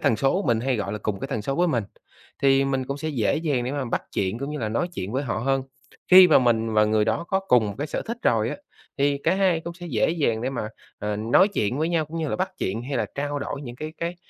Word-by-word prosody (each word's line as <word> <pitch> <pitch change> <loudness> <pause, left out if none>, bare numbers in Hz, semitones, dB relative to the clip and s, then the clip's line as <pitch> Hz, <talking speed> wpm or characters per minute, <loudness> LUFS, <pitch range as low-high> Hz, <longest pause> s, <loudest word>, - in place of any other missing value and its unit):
tần 110 - +2
số 135 - +1
mình 115 -2 +2
hay 130 0 0
gọi 100 -2 -3
là 105 - -3
cùng 100 -3 -3
cái 135 - -4
tần 125 -7 -3
số 135 +5 -2
với 175 +1 +2
mình, 120 -8 0 0.6
thì 135 0 +4
mình 135 -1 -1
cũng 140 - -3
sẽ 155 +1 -3
dễ 125 -5 +1
dàng 145 -6 0
để 130 - -3
mà 140 -2 -2
bắt 120 - -2
chuyện 95 +3 -1
cũng 140 +3 -4
như 150 - -4
là 110 - -2
nói 115 +11 -1
chuyện 95 +4 -4
với 135 +2 0
họ 115 -5 -2
hơn. 135 +3 0 0.5
Khi 185 0 +10
mà 155 - +7
mình 115 -3 +1
và 105 0 +4
người 105 0 +2
đó 110 +9 -1
có 190 0 +1
cùng 125 - +3
một 100 - -4
cái 145 - -2
sở - - -3
thích 230 +1 -5
rồi 115 -1 +2
á, - - -4 0.4
thì 140 0 +2
cả 170 - +3
hai 185 -4 +2
cũng 170 +1 -7
sẽ 175 0 -9
dễ 130 0 +1
dàng 130 -9 0
để 130 - -1
mà, 120 -5 -3 0.3
ờ, 105 0 -2
nói 115 - +4
chuyện 125 - -1
với 160 - +1
nhau 165 -2 +1
cũng 165 +2 -6
như 155 -2 -1
là - - -2
bắt 185 +1 -1
chuyện 110 +5 -2
hay 135 +1 -3
là 110 -3 0
trao 145 +1 -2
đổi 140 0 -5
những 120 -2 -8
cái 155 +3 -6
cái 170 +1 -3
135 Hz, 295 wpm, -24 LUFS, 110-155 Hz, 0.6 s, Khi